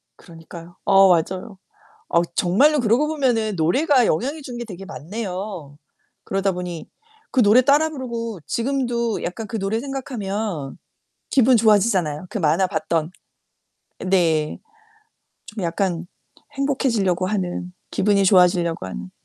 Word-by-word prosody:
그러니까요. 165 +1 -13
어 195 -1 +6
맞아요. 185 +4 0 0.5
어 170 0 +3
정말로 275 +12 +3
그러고 240 +6 +2
보면은 240 -9 0
노래가 250 - +3
영향이 280 - -1
주는 245 -3 -7
게 240 - -5
되게 195 -3 -9
많네요. 185 -4 -6 0.5
그러다 195 0 0
보니 180 -2 -6 0.4
그 255 - +3
노래 215 +4 +6
따라 295 +4 +3
부르고 235 - -5
지금도 235 -3 -1
약간 210 +5 -5
그 225 - -4
노래 195 +3 -1
생각하면 215 - -4 0.5
기분 255 -1 +5
좋아지잖아요. 200 -8 +2
그 - - -3
만화 170 +2 +2
봤던 160 -1 -2 1.0
네. 165 -5 +1 0.9
좀 210 -4 -6
약간 175 0 -1 0.5
행복해지려고 235 -10 0
하는. 180 -3 -3 0.2
기분이 200 0 +2
좋아지려고 180 - +3
하는. 90 -1 -7
195 Hz, 290 characters per minute, -22 LUFS, 175-235 Hz, 1.0 s, 어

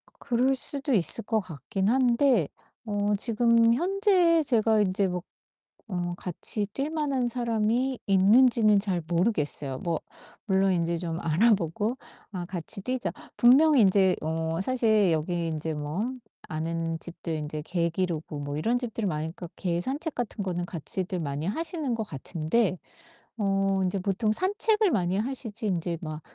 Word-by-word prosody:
그 - - -26 0.2
그럴 265 +2 +3
수도 280 +1 +4
있을 215 +2 +4
것 220 -2 0
같긴 185 +3 -3
한데 245 - +3 0.4
어 205 -1 0
지금 230 +1 +3
현재 360 - +3
제가 225 -5 +2
인제 195 0 +1
뭐 180 -1 -4 0.7
어 175 -2 -2
같이 200 +4 -3
뛸 275 +2 -2
만한 280 -6 -1
사람이 235 +2 0
있는지는 215 +2 +5
잘 190 -4 -2
모르겠어요. 155 - 0
뭐 170 -2 -2 0.5
물론 195 -2 +2
인제 170 -1 0
좀 165 -1 -4
알아보고 205 +5 +1 0.3
아 180 -3 -5
같이 175 +1 -6
뛰자 255 +4 -2 0.3
분명 285 +5 +6
인제 190 -4 +4
어 160 +1 -2
사실 220 -5 +2
여기 165 +2 -1
인제 160 0 -3
뭐 155 +11 -3 0.4
아는 165 +1 -3
집들 170 -1 -6
인제 150 0 -5
개 170 0 -1
기르고 165 -4 -3
뭐 145 0 -4
이런 230 +10 0
집들이 230 -3 -3
많으니까 160 +1 -4
개 175 -2 -1
산책 285 - -4
같은 230 -4 -3
거는 175 -2 -2
같이들 180 +2 -4
많이 145 -1 -3
하시는 315 - -2
것 225 - -2
같은데 175 - -1 0.6
어 195 -1 +1
인제 185 +1 -1
보통 200 +3 0
산책을 415 - +2
많이 180 -2 0
하시지 225 -2 -4
인제 175 -3 -1
막 155 -1 -6
195 Hz, 280 characters per minute, -27 LUFS, 170-240 Hz, 0.7 s, 분명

